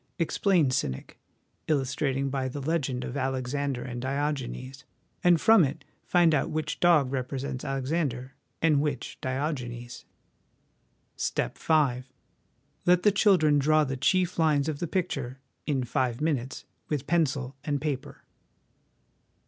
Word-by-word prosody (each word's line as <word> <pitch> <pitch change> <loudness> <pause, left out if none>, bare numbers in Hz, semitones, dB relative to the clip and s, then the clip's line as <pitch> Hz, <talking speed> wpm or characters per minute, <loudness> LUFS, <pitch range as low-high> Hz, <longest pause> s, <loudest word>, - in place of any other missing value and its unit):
Explain 170 -3 +2
cynic, 65 - -3 0.5
illustrating 135 -1 0
by 135 -1 -1
the 130 +3 -5
legend 135 -4 -1
of 125 - -5
Alexander 135 0 -2
and 120 -1 -5
Diogenes; 135 -1 -3 0.4
and 175 -2 +5
from 220 -1 +6
it 140 0 -3 0.2
find 175 -2 +4
out 145 - +1
which 155 -1 -3
dog 155 -7 +4
represents 130 0 -3
Alexander 135 -1 -2 0.3
and 155 -3 +4
which 145 -4 -3
Diogenes. 130 -3 -4 0.6
" - - -43
Step - - -2
V. 145 -6 +2 0.9
Let 180 0 +5
the 210 - +6
children 180 -7 +4
draw 155 +2 +4
the 135 -2 -2
chief 180 +6 +1
lines 150 -3 +3
of 150 -2 -3
the 175 - -2
picture, 140 -9 -2 0.3
in 135 -4 0
five 125 -1 -1
minutes, 140 -5 -2 0.2
with 150 -4 -2
pencil 140 -5 0
and 145 -2 -1
paper." 140 -2 -4
140 Hz, 130 wpm, -27 LUFS, 130-155 Hz, 0.9 s, from